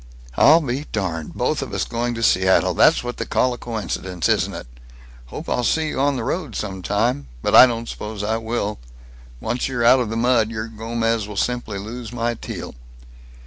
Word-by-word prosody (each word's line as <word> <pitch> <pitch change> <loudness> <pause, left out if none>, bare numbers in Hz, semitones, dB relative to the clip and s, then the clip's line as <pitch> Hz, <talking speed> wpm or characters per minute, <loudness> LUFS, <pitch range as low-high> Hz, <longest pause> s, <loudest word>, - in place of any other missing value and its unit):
"I'll 160 +3 +6
be 140 0 -3
darned. 85 -7 -3
Both - - 0
of - - -5
us - - 0
going 120 +1 -2
to 115 - -4
Seattle. 95 -3 +3
That's - - +4
what 120 0 -5
they - - -3
call 125 0 +1
a - - -7
coincidence, 95 -6 -3
isn't - - +1
it! - - -7 0.6
Hope - - -8
I'll 125 - 0
see 155 +6 +1
you 130 - -4
on 140 +1 +2
the 120 - -3
road, 140 - -3
some 95 -3 -4
time. 105 - 0 0.2
But - - 0
I 130 - +10
don't 115 -1 -4
suppose 105 -2 -6
I 110 +2 0
will. 110 -2 -3 0.6
Once 120 - -2
you're 125 -3 -1
out 130 +2 +7
of 120 -4 -1
the 115 - -3
mud, 115 -2 +3
your 115 0 -5
Gomez 115 -1 -2
will 105 -1 -8
simply 120 -4 -1
lose 115 +3 -7
my 120 -1 -1
Teal." - - -7
115 Hz, 200 wpm, -21 LUFS, 105-125 Hz, 0.6 s, I